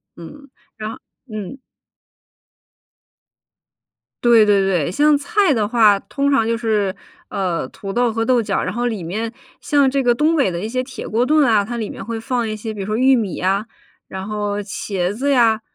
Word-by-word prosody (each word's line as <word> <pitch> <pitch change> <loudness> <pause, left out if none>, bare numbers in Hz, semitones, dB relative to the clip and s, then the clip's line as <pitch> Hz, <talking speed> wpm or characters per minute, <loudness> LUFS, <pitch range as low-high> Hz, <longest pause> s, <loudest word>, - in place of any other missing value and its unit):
嗯， 275 - -12 0.3
然 215 0 -5
后 - - -9 0.3
嗯。 215 +4 -6 2.7
对 235 -3 +6
对 205 -1 +4
对。 180 -5 0
像 295 +8 +4
菜 390 +2 +2
的 215 -3 0
话， 215 -3 +4
通 280 +5 -1
常 225 -5 +2
就 230 0 0
是， 210 -4 0 0.3
呃， 175 -8 -2
土 195 - -7
豆 240 -1 +2
和 225 0 -1
豆 250 -1 +3
角， 205 -3 -1
然 185 - -3
后 240 +2 -2
里 215 -7 -3
面 220 +7 -3 0.3
像 285 -2 +3
这 275 +1 0
个 245 -2 +3
东 310 +4 +2
北 275 -11 +2
的 170 - -4
一 210 - -3
些 255 +3 -2
铁 260 0 -8
锅 230 +3 +1
炖 305 +1 +4
啊， 215 -3 +4
它 235 +4 -5
里 220 -3 -3
面 - - -8
会 230 0 -4
放 240 0 -2
一 215 - -3
些 220 +1 -6
比 210 - -9
如 195 - -3
说 215 +2 -2
玉 260 +2 +5
米 210 -6 -2
呀， 195 +4 0 0.4
然 190 +1 -6
后 205 -1 -2
茄 195 -2 -3
子 265 +7 -2
呀。 230 -4 +3
225 Hz, 210 characters per minute, -19 LUFS, 200-255 Hz, 2.7 s, 对